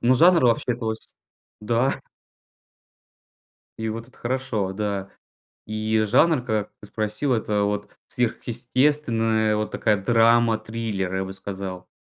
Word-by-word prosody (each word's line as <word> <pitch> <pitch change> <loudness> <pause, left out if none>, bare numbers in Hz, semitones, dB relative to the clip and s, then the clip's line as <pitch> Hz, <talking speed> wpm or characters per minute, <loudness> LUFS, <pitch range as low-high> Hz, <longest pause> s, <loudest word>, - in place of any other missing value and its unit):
Но 125 +2 +4
жанр 170 +4 +6
вообще 120 +1 +2
плось 110 -2 -5 0.5
Да. 120 +5 +1 1.8
И 110 0 -3
вот 115 +2 -5
это - - -22
хорошо, 120 -6 -2
да. 100 -1 -3 0.6
И 110 0 0
жанр, 135 +5 +3
как 110 -4 -2
ты 105 - -11
спросил, 110 +6 -1
это 105 -2 0
вот, 105 0 -2 0.2
сверхъестественная 120 -2 +1
вот 105 0 -2
такая 105 -3 +1
драма-триллер, 115 -3 +2
я 95 - 0
бы 95 - -7
сказал. 95 -1 -7
110 Hz, 120 wpm, -24 LUFS, 105-120 Hz, 1.8 s, жанр